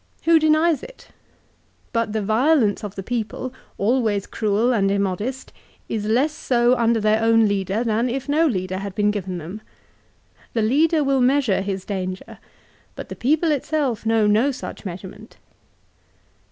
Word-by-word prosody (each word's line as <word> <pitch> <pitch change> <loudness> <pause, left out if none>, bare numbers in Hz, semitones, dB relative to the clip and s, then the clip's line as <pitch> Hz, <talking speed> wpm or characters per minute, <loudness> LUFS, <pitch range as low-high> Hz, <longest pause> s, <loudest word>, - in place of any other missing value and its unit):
Who 330 0 +5
denies 310 -1 +3
it? - - -13 0.8
But 230 -2 0
the 215 -1 -2
violence 225 0 +2
of 205 -1 -6
the 195 - -5
people, 245 +3 -4 0.2
always 215 -2 +1
cruel 220 +3 0
and 195 -4 +2
im 200 0 +1
modest, 210 +8 -4 0.3
is 210 -2 -3
less 255 +8 +2
so 245 -5 +2
under 235 -1 +2
their 215 +1 +2
own 225 -1 +4
leader, 200 +2 -1
than 230 +1 0
if 265 +3 -4
no 310 +3 +3
leader 185 -6 -2
had 195 -1 -6
been 210 0 +2
given 190 -3 -4
them. 175 +6 -8 0.9
The 225 - +1
leader 300 +7 +3
will 275 -1 +2
measure 250 -6 +2
his 195 -1 -4
danger; 185 -2 -5 0.6
but - - -8
the - - -6
people 310 +5 +1
itself 285 -4 -1
know 225 -1 +2
no 215 +6 +3
such 260 -4 -7
measurement." 195 +4 -9
225 Hz, 155 wpm, -22 LUFS, 205-265 Hz, 0.9 s, Who